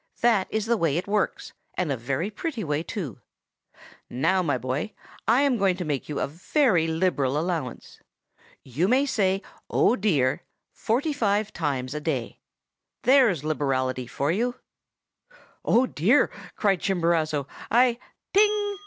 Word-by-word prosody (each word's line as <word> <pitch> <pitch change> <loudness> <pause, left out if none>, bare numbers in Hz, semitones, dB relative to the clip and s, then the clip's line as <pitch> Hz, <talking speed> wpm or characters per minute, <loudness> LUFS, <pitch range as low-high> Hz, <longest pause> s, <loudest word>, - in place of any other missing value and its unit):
'That 225 -5 +3
is 215 -1 -1
the 235 0 +2
way 165 -5 +1
it 180 - -3
works, 205 0 -1 0.2
and 175 -5 -1
a - - +1
very 135 - -2
pretty 235 +2 -4
way, 150 -2 -1
too. 165 - -5 0.9
Now, 165 +9 +1
my 145 -7 0
boy, 130 - -3 0.3
I 255 - +4
am 275 -5 +2
going 190 -2 +2
to 180 - -4
make 145 -2 -3
you 150 - -2
a - - +1
very 175 - +1
liberal 160 -5 0
allowance. 160 -6 -4 0.6
You 140 +8 -1
may 260 +5 +3
say 195 -7 +1 0.3
"Oh, 235 - +3
dear!" 145 - +1 0.3
forty 275 +8 0
five 210 -5 0
times 135 -5 -2
a 150 - -4
day. 135 -7 -3 0.6
There's 245 - +4
liberality 130 -4 -1
for 140 +5 -1
you!' 240 +7 0 1.1
"'Oh, 245 +3 +4
dear!' 235 - +2 0.2
cried 200 -4 +2
Chimborazo, 165 -6 0 0.2
'I—' 240 +1 +3 0.3
"'_Ting! 410 0 +2
180 Hz, 145 wpm, -25 LUFS, 145-225 Hz, 1.1 s, I